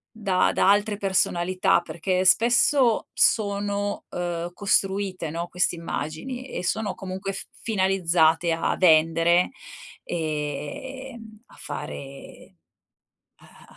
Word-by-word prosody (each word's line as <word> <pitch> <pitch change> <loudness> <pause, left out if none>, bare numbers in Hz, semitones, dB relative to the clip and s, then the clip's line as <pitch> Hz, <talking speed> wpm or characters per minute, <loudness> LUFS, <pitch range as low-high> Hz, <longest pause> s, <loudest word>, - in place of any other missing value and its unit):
da 195 -4 +1
da - - +3
altre 205 +1 +2
personalità 185 -2 +1
perché 185 +2 -2
spesso 240 +3 +4
sono, 205 -1 +1
uhm, 175 -1 -4
costruite, 195 -4 0
no, 170 +1 -4
queste 180 0 0
immagini, 170 - -5
e - - -5
sono 205 +4 -1
comunque 190 +1 -5
f 195 - -7 0.2
finalizzate 175 -5 +2
a 165 - 0
vendere, 165 +1 +4 0.5
ehm, 210 - -5
a - - -19
fare 135 0 -9 1.0
a - - -18
185 Hz, 100 wpm, -24 LUFS, 170-205 Hz, 1.0 s, spesso